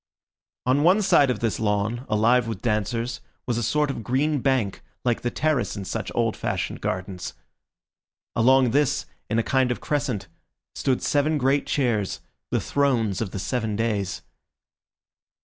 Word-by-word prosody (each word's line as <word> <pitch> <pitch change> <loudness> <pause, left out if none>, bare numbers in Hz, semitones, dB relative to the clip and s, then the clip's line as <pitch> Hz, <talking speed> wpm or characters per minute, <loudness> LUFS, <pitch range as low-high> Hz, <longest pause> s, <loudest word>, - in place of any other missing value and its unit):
On 130 +3 +3
one 185 +7 +5
side 140 -7 +5
of 125 - -1
this 115 -2 0
lawn, 110 +4 0
alive 115 +3 +3
with 110 -4 -5
dancers, 115 +2 -1 0.2
was 120 -2 0
a - - -1
sort 145 +6 +1
of 115 - -6
green 140 +6 +1
bank, 125 -7 0 0.2
like 120 -2 +1
the 120 - 0
terrace 140 -7 0
in 100 - -5
such - - -4
old - - +1
fashioned - - -3
gardens. 90 -1 -4 1.0
Along 130 +1 +5
this, 145 +1 +2 0.2
in 110 - +1
a 115 - +3
kind 130 0 +2
of 125 - -1
crescent, 135 -10 -2 0.5
stood 130 -2 0
seven 150 +2 +2
great 140 +1 +1
chairs, 115 -8 0 0.3
the - - +1
thrones 120 -9 +1
of 110 - -1
the 95 - -6
seven 110 +2 -2
days. 105 -4 -1
120 Hz, 155 wpm, -25 LUFS, 110-135 Hz, 1.0 s, one